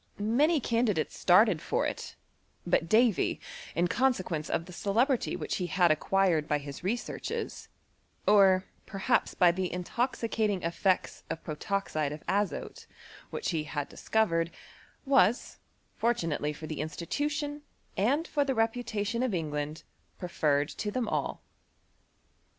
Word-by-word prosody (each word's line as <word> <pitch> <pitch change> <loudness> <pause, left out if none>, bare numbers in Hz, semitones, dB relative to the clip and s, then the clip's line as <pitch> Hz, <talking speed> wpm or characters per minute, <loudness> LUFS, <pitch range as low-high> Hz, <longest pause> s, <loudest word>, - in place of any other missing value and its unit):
Many 275 +10 +3
candidates 230 - 0
started 185 -1 +5
tor - - -1
it; - - -5 0.5
but 165 - +1
Davy, 225 -1 +3 0.4
in 170 +3 +2
consequence 185 - 0
of 165 - -1
the 180 - -11
celebrity 235 +8 +1
which - - -3
he 180 - -2
had 175 0 +3
acquired 165 -1 +2
by 150 - +2
his 140 +1 -8
researches, 230 +6 -3 0.6
or 195 -2 +6 0.2
perhaps 195 -2 0
by 180 -2 +6
the 180 +1 -2
intoxicating 215 +1 -1
e£fects 180 +3 0
of 165 - -5
protoxide 155 -2 -2
of 150 +1 -8
azote^ 195 -3 -2 0.4
iHiich - - -3
he 155 -2 -1
had 145 -1 -4
discovered, 165 -7 +1 0.6
was, 250 -5 +3 0.4
fortunately 165 -11 0
for 150 +1 -8
the 155 -2 -4
institution 290 - -3 0.3
and 275 - +1
for 290 - +1
the 270 -2 -1
reputation 225 -1 -1
of 250 -6 0
England, 150 -1 -3 0.3
pre 180 - -6
fanced 145 -3 0
to 210 - -1
them 235 +2 -2
ail. - - -2
190 Hz, 130 wpm, -29 LUFS, 165-230 Hz, 0.6 s, or